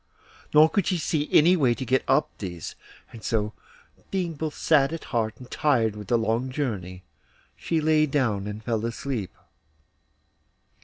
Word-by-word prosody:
Nor 155 +1 +7
could 200 +2 0
she 185 - +1
see 155 -2 -1
any 170 +4 +6
way 130 -8 +2
to 130 - -5
get 130 +2 +2
up 150 - +3
these, 85 -5 -6 0.4
and 115 -2 -11
so, 110 -1 -1 0.6
being 180 -4 -2
both 155 0 -4
sad 145 -3 +3
at 165 - -5
heart 110 -3 -1
and 125 - -13
tired 115 -8 +2
with 105 -2 -8
the 120 - +3
long 115 +3 0
journey, 100 -10 -4 0.5
she 165 - -1
lay 155 0 +3
down 110 -9 0
and 105 +1 -6
fell 115 -1 -1
asleep. 115 -3 -3
130 Hz, 160 wpm, -25 LUFS, 110-155 Hz, 0.6 s, Nor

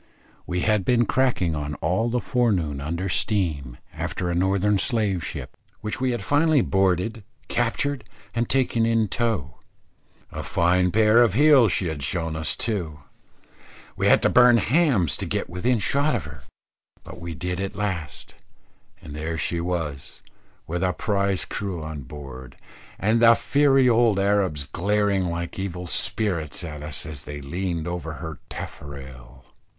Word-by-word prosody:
We 90 0 -1
had 105 -1 +2
been 120 +2 +3
cracking 120 -11 +1
on 75 0 -4
all 95 +11 0
the 125 +1 0
forenoon 95 - 0
under 85 +6 -3
steam, 80 - 0 0.2
after 90 -1 -3
a - - 0
Northern 95 +3 +2
slave 105 -7 +1
ship, - - -6 0.3
which 105 +4 -4
we 130 - +2
had 120 -4 -2
finally 150 +2 +3
boarded, 95 +2 0 0.3
captured, 130 +3 0 0.3
and 120 0 -1
taken 125 -3 +1
in 115 -2 +2
tow. 105 - -2 0.7
A - - -5
fine 90 +1 +2
pair 110 +4 +5
of 115 -5 +3
heels 140 -6 +6
she 90 - 0
had 80 -4 -3
shown 80 +3 -2
us 80 0 -1
too. 85 -10 -3 0.9
We - - 0
had - - +5
to - - +4
burn 125 -1 +6
hams 115 - +2
to - - -4
get - - -2
within 115 +8 +1
shot 140 +7 +2
of 95 -11 -3
her. 75 -1 -10 0.6
But - - -11
we 85 -1 -6
did 90 +4 -3
at 95 0 -4
last, 90 -10 -4 0.7
and 75 - -9
there 80 +2 -3
she 85 +1 -1
was, 80 -6 -4 0.4
with 85 +2 -3
a 90 -1 +1
prize 100 -2 -1
crew 95 -6 -4
on 80 -2 -6
board, 65 -2 -10 0.4
and 110 +3 +1
the 115 0 +8
fiery 135 -1 +3
old 115 -3 +4
Arabs 95 -7 +1
glaring 100 +4 0
like 85 +1 -4
evil 90 -2 -4
spirits 85 -4 -1
at 75 -3 -7
us 75 -1 -2
as 75 -5 -8
they 75 0 -6
leaned 85 +3 -3
over 85 -2 -4
her 80 -1 -7
taffrail. 65 -3 -9
95 Hz, 155 wpm, -24 LUFS, 80-115 Hz, 0.9 s, the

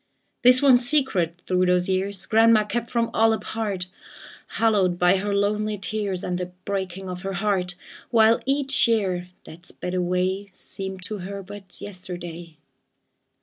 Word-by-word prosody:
This 250 +2 +6
one 260 -3 +7
secret 230 - 0
through 185 0 +2
those 180 0 +2
years 190 +1 -1
Grandma 225 -1 +5
kept 235 +2 -3
from 235 -1 0
all 225 0 +4
apart, 215 -4 -3 0.7
Hallowed 200 -6 +2
by 180 +2 +4
her 200 +1 -1
lonely 210 +1 0
tears 200 -2 -3
And 180 0 -2
the 180 - -3 0.2
breaking 190 -1 -3
of 180 -1 -6
her 195 0 -4
heart; 185 -2 -1 0.3
While 225 0 +4
each 275 -2 +2
year 190 -6 0 0.2
that 175 +3 -12
sped 180 - -6
away 185 +2 -1
Seemed 190 -1 -7
to 210 +2 -5
her 195 +2 -6
but 195 -1 -9
yesterday. 175 -4 -8
195 Hz, 145 wpm, -24 LUFS, 180-220 Hz, 0.7 s, one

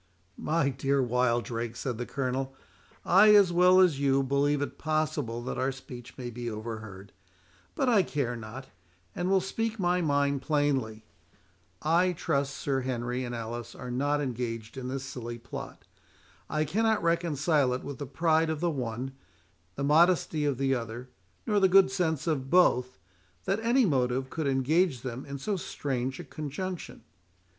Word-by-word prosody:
"My 155 -2 +1
dear 135 +1 0
Wildrake," 120 -2 0
said 120 -1 -4
the 120 - -3
Colonel, 135 0 -2 0.5
"I, 210 +4 +7
as 195 -4 +5
well 180 +1 +6
as 175 -7 +4
you, 135 -1 +3
believe 140 +2 +1
it - - -7
possible 155 -7 -1
that 125 - -4
our 130 +1 +1
speech 125 -2 -11
may 125 -2 -5
be 120 0 -5
overheard; 110 -3 -7 0.6
but 270 - 0
I 225 -5 +5
care 140 -8 -2
not, 115 +4 -8 0.5
and 175 +1 -2
will 195 0 +4
speak 225 +4 -2
my 180 -2 +1
mind 140 -3 +1
plainly. 135 -7 0 0.8
I 175 +4 +3
trust 140 -4 -1
Sir 135 -2 -1
Henry 125 0 -2
and 120 -1 -4
Alice 115 +1 -6
are 125 -1 -7
not 145 +4 0
engaged 115 -4 -4
in 130 -1 -5
this 135 +1 -3
silly 120 -3 -6
plot; 120 0 -9 0.6
I 155 +1 0
cannot 220 +7 +1
reconcile 160 -4 +2
it 125 - -3
with 140 - -7
the 145 - -5
pride 160 +2 +2
of 160 -2 -2
the 170 +1 +1
one, 125 -1 -4 0.6
the 140 - -3
modesty 160 0 +3
of 140 -3 0
the 135 0 +1
other, 120 +1 -5 0.4
nor 210 -1 +2
the 190 -1 +4
good 190 0 +6
sense 165 -6 0
of 140 -5 -1
both, 125 -8 +3 0.5
that 195 - 0
any 240 +3 +3
motive 130 -4 0
could 160 -3 -2
engage 135 +2 +2
them 130 +1 -6
in 140 0 -5
so 200 +8 -2
strange 135 -5 -3
a - - -5
conjunction. 165 +5 -6
140 Hz, 165 wpm, -29 LUFS, 125-165 Hz, 0.8 s, I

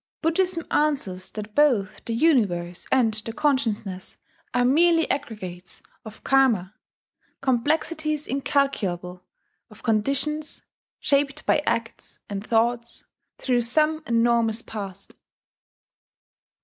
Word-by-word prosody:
Buddhism 335 +1 +1
answers 265 -12 0
that 210 0 -8
both 245 -8 +2
the 230 - -2
universe 195 - +1
and 240 -4 +3
the 215 +1 -4
consciousness 225 -9 -1 0.3
are 245 0 +2
merely 330 +5 +4
aggregates 190 -10 -6 0.2
of 220 -1 -12
Karma 235 -9 +3 0.7
complexities 300 +4 0
incalculable 200 -11 -1 0.5
of 215 -1 -17
conditions 275 +7 0 0.4
shaped 280 +1 0
by - - +3
acts 230 0 -3
and 200 0 -4
thoughts 235 +1 0 0.3
through 245 -2 +1
some 305 +6 +2
enormous 230 -1 +2
past. 200 -3 -5
235 Hz, 95 wpm, -24 LUFS, 210-290 Hz, 0.7 s, merely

